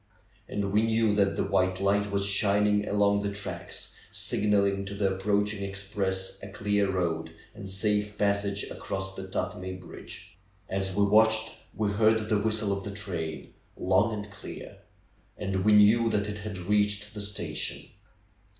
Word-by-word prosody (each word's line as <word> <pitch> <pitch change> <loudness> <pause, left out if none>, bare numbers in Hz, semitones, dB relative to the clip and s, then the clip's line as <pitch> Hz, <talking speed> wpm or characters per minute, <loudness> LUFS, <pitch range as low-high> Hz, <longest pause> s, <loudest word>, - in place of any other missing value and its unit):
And 100 - -2
w'e 100 +2 +2
knew 115 -1 +2
that 100 -1 +2
the - - 0
white 95 0 +1
light 100 +1 +2
was 100 0 0
shining 105 +1 +3
along 100 0 +3
the 100 0 -2
tracks, 95 -3 -5 0.2
signaling 100 -1 +1
to 100 +1 -6
the 100 -1 +1
approaching 105 +1 0
express 95 -1 -3
a 100 - -8
clear 100 0 0
road 80 -3 -1 0.2
and 100 -3 -8
safe 105 +1 0
passage 100 0 +1
across 95 0 -4
the 95 0 -7
Tuthmay 95 0 -4
bridge. 90 0 -10 0.3
As 95 -1 -2
we 100 - +3
watched 110 +2 +4 0.2
we 105 -1 0
lieaTd 110 +1 +2
the 110 -2 +3
whistle 110 -1 +1
of 100 - -6
the - - -5
train, 85 -6 -5 0.2
long 95 +5 +3
and 105 -1 -5
clear. 100 - -9 0.6
And 95 -2 -1
we 105 +1 +5
knew 110 +3 +6
that 105 -1 0
it 105 0 -4
had 105 -2 -5
reached 105 +3 0
the 105 - -5
station. 100 0 -4
100 Hz, 160 wpm, -28 LUFS, 95-105 Hz, 0.6 s, knew